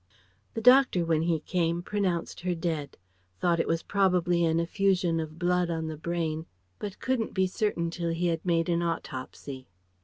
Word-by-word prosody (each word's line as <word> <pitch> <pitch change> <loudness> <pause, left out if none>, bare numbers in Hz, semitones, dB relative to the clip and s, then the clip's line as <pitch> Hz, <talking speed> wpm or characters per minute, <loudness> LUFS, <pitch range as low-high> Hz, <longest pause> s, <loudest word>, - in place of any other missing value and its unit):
] 95 +3 -39
The 225 - -2
doctor 250 -7 +6
when 160 -1 +2
he 165 -2 +1
came 170 0 0
pronounced 185 -4 -1
her 180 0 -1
dead, 160 -4 -3 0.4
thought 170 -1 +2
it - - +1
was 165 0 0
probably 180 -3 +2
an 165 0 +2
effusion 180 -1 +1
of 155 0 -5
blood 180 0 +1
on 165 -1 -2
the 160 0 -4
brain 160 0 -2 0.3
but 205 -2 -5
couldn't 255 -5 -1
be 190 -1 +3
certain 185 -4 -1
till 170 0 -2
he 165 +2 -1
had 165 -2 0
made 165 -2 +1
an 170 -1 +1
autopsy. 135 -4 -5
170 Hz, 180 wpm, -28 LUFS, 165-180 Hz, 0.4 s, doctor